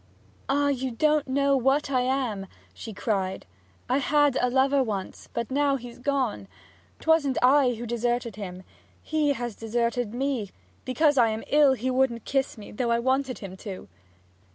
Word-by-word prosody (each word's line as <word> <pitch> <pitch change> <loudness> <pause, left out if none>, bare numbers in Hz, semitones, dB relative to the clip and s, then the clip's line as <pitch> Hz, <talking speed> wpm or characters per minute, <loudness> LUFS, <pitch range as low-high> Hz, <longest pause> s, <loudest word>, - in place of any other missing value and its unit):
'Ah, 285 +1 +2
you 265 -1 -1
don't 300 +5 +1
know 280 +1 +2
what 270 +2 +1
I 255 -2 +2
am!' 250 -7 -1 0.3
she 225 - -8
cried. 195 -2 -2 0.4
'I 255 +3 +2
had 290 -1 +3
a 250 - +2
lover 270 +2 +3
once; 205 -6 -4
but 235 +1 -4
now 280 0 +2
he's 245 -2 -8
gone! 255 - -1 0.5
'Twasn't 315 -5 +2
I 260 -1 +5
who 235 +2 -6
deserted 240 -1 -1
him. 185 -3 -7 0.4
He 305 -2 +1
has 240 -4 -5
deserted 235 0 -1
me; 260 -6 -1 0.4
because 290 +2 +2
I 230 -2 +5
am 220 +1 -3
ill 290 -2 +5
he 260 +1 -2
wouldn't 255 -3 +1
kiss 270 -3 -1
me, 210 - -10
though 235 +3 -2
I 235 - +3
wanted 260 +2 0
him 190 -2 -8
to!' 190 - -8
255 Hz, 165 wpm, -26 LUFS, 230-275 Hz, 0.5 s, I